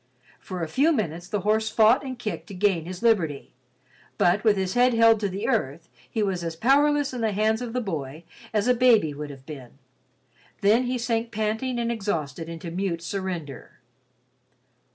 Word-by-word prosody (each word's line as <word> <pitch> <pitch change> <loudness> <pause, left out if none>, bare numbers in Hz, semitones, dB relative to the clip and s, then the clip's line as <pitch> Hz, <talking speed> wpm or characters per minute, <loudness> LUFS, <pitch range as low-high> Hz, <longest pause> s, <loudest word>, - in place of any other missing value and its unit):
For 180 -2 -6
a - - -2
few 280 - +2
minutes 175 - -2
the 210 - -2
horse 220 +2 +1
fought 225 +5 +4
and 260 -2 -6
kicked 220 -3 -5
to 200 - -9
gain 180 -4 +1
his 185 +4 -7
liberty, 175 -12 +1 0.6
but 180 +4 +2
with 215 -3 +4
his 190 -1 -1
head 245 0 +3
held 225 -1 +5
to 205 -2 -1
the 195 +2 -4
earth, 170 - -1 0.2
he 220 -3 -1
was 190 -4 -2
as 165 -1 -4
powerless 285 - +2
in 245 - -4
the 220 -2 0
hands 220 +3 +1
of 245 -2 -4
the 250 - -1
boy 155 - -5 0.3
as 215 +1 0
a 250 - +5
baby 230 -10 +4
would 150 +1 -6
have 135 -2 -12
been. 135 -4 -10 0.8
Then 220 +5 +4
he 250 +1 -1
sank 230 -1 -2
panting 220 +3 -2
and 235 0 -1
exhausted 165 - -3
into 165 0 -7
mute 175 -2 -2
surrender. 175 -8 -5
205 Hz, 185 wpm, -25 LUFS, 170-235 Hz, 0.8 s, held